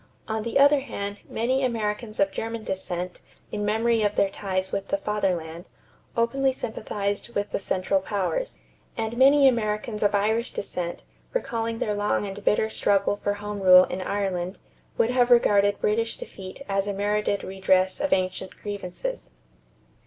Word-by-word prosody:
On 220 0 -2
the 230 +2 -1
other 285 +1 +6
hand, 205 -6 -5
many 255 +4 0
Americans 220 -2 -2
of 195 0 +3
German 225 +2 -4
descent, 180 -2 -4 0.3
in 210 -1 -2
memory 225 +2 +2
of 205 -1 +1
their 195 - +2
ties 190 -2 -2
with 195 - -3
the 295 - 0
Fatherland, 180 - -2 0.5
openly 265 +4 +2
sympathized 210 -1 -4
with 205 0 -1
the - - -1
Central 190 0 0
Powers; 205 - -2 0.4
and 225 0 -2
many 275 +2 +6
Americans 215 -2 0
of 205 0 +3
Irish 220 +4 +1
descent, 175 -3 -4 0.3
recalling 230 - -2
their 210 - -1
long 205 0 0
and 200 +1 -7
bitter 220 - +3
struggle 205 -2 +1
for 205 - -1
home 205 0 -5
rule 185 -1 +9
in 185 0 -4
Ireland, 185 -2 -2 0.4
would 230 - +3
have 250 -1 +3
regarded 205 -4 +4
British 225 +2 0
defeat 190 +7 -9
as 195 0 0
a 205 - -1
merited 205 0 0
redress 190 0 +1
of 290 0 -1
ancient 185 0 -1
grievances. 205 - -5
205 Hz, 155 wpm, -25 LUFS, 195-230 Hz, 0.5 s, rule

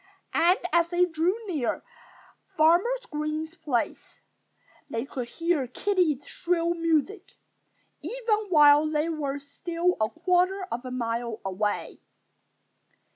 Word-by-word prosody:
And 350 +4 +4 0.2
as 340 0 +3
they 355 +1 +3
drew 345 +4 0
near 305 - -2 0.7
Farmer 335 +8 +5 0.2
Green's 305 +1 -3
place 265 -9 -3 0.7
they 230 +2 -3
could 255 -3 -5
hear 330 -1 -1
Kiddie's 320 -1 0
shrill 340 -1 0
music, 335 +4 -1 0.7
even 455 -3 -1
while 295 -2 +6
they 310 +1 0
were 285 -4 -2
still 335 +5 -2
a 215 - +2
quarter 365 +3 +1
of 240 +2 -3
a - - -4
mile 235 -2 -3
away. 205 +2 -2
320 Hz, 115 wpm, -27 LUFS, 275-355 Hz, 0.7 s, while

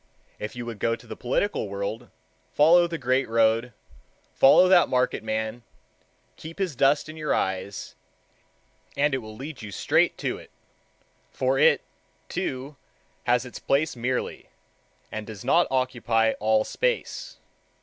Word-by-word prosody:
If 105 - -6
you 120 -1 -5
would 115 -3 -7
go 115 +3 +1
to - - -17
the - - -8
political 125 - -1
world, 100 +4 -4 0.4
follow 170 +4 +6
the 170 -1 -4
great 130 -2 0
road,—follow 115 - +2
that 180 -2 +5
market 125 -2 0
man, 110 +1 -3 0.8
keep 160 +1 -10
his 185 -7 -2
dust 140 +4 +3
in 155 +1 -9
your 155 -1 0
eyes, 95 +1 -3 1.0
and 145 0 +2
it 135 - +1
will 110 -2 -10
lead 140 +4 -8
you 110 - -7
straight - - +2
to - - -3
it; - - -15 0.8
for 130 +1 0
it, - - +5 0.5
too, 130 +2 -4 0.5
has 125 +1 +2
its 125 - -9
place 150 +3 +1
merely, 125 +1 -3 0.6
and 110 -1 -5
does 110 -4 -9
not 175 - +4
occupy 120 -4 +1
all 110 0 +3
space. - - -2
125 Hz, 140 wpm, -25 LUFS, 110-145 Hz, 1.0 s, follow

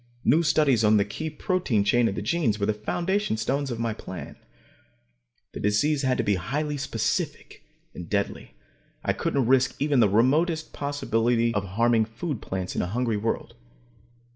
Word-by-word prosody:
New 155 +7 +5
studies 150 -7 +3
on 105 0 +5
the 100 - +2
key 155 +10 -5
protein 155 - 0
chains 120 +3 +3
of 95 - -4
the - - -4
genes 145 -12 +1
were 100 - +1
the 110 - +1
foundation 175 - -1
stones 135 +5 -1
of 120 - -3
my 115 -1 -1
plan. 95 -3 -8 1.2
The - - -7
disease 135 +9 +1
had 130 -2 +1
to - - 0
be 100 -2 +2
highly 145 - -2
specific 125 -5 -3 0.3
and 85 -2 -9
deadly. 100 - -2 0.5
I - - +2
couldn't 135 -3 0
risk 130 +1 +3
even 145 -2 +2
the 110 -4 +5
remotest 155 - +2
possibility 120 -5 0
of 100 -2 -1
harming 115 -1 +3
food 115 +4 -5
plants 95 -1 -4
in - - 0
a - - -2
hungry 115 +2 -1
world. 115 +2 -3
120 Hz, 170 wpm, -26 LUFS, 105-145 Hz, 1.2 s, New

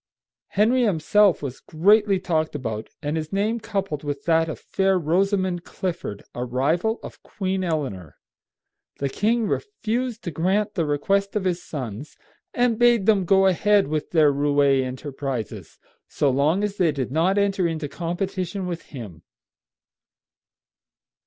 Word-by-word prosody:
Henry 230 +5 +2
himself 200 -2 +3
was 135 -2 -5
greatly 200 +4 +3
talked 160 -4 -1
about, 110 -5 -4
and 150 +1 -1
his 155 -1 -4
name 210 +4 0
coupled 195 -9 -3
with 145 -1 -4
that 165 -1 +3
of - - -4
fair 195 -1 +1
Rosamond 185 +2 +1
Clifford, 170 - -5
a 125 - -3
rival 155 - 0
of - - -10
Queen 190 -1 -3
Eleanor. 130 - -3 0.8
The 140 - -1
king 225 - +1
refused 245 - -2
to 170 - -4
grant 190 +7 0
the 165 -5 -1
request 195 +8 0
of 210 - 0
his 180 -2 -1
sons, 130 -2 -7 0.3
and 245 -2 +1
bade 240 -4 +4
them 200 -4 +3
go 195 +2 +4
ahead 200 -1 +3
with 155 -1 -2
their 155 -4 +4
roué 140 -1 +3
enterprises 130 -2 -5 0.3
so 140 - +1
long 150 +9 +2
as 205 -1 -2
they 170 -4 +3
did 135 -3 -3
not 170 +7 +2
enter 195 -3 +2
into 160 -2 -3
competition 180 +4 -3
with 175 -2 -4
him. 105 - -9
175 Hz, 145 wpm, -23 LUFS, 145-200 Hz, 0.8 s, bade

